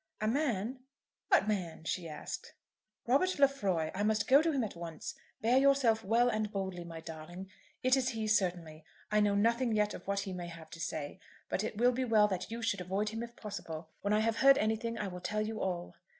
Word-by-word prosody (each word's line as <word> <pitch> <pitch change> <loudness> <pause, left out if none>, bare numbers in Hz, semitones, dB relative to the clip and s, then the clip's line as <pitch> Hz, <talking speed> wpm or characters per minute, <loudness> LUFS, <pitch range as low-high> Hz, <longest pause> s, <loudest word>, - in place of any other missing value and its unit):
"A 215 - 0
man; 250 -2 0 0.5
what 380 - +4
man?" 180 -7 -2
she 170 +1 -2
asked. 150 - -7 0.5
"Robert 285 +10 +2
Lefroy. 200 - +2
I 195 - -3
must 215 0 +1
go 275 +3 +7
to 325 0 +1
him 270 -5 0
at 210 - -5
once. 170 -2 -6 0.3
Bear 240 +4 +4
yourself 265 -5 +4
well 230 +4 +3
and 215 -3 0
boldly, 190 -3 -3
my 165 -1 -8
darling. 165 +4 -8 0.3
It 255 +1 +5
is 260 -1 +1
he, 225 -3 -3
certainly. 175 -6 0 0.3
I 210 - +4
know 205 -1 +3
nothing 230 +3 +2
yet 210 0 +2
of - - -9
what 200 0 0
he 195 -1 -5
may 175 -1 -5
have 165 -2 -11
to 165 - -9
say, 155 0 -4 0.3
but 195 - -1
it 215 - -4
will 245 +2 +5
be 255 +1 -1
well 220 -4 +4
that 185 -2 -3
you 230 +1 -5
should 205 -4 0
avoid 195 +4 -1
him 225 +1 -5
if 235 0 -7
possible. 165 -6 -7
When 200 - -1
I 210 +1 +4
have 225 0 +1
heard 275 0 +7
anything 220 +2 0
I 210 - -2
will 180 -1 -7
tell 210 +4 -1
you 220 0 -4
all." 175 -2 -2
210 Hz, 220 wpm, -33 LUFS, 180-235 Hz, 0.5 s, go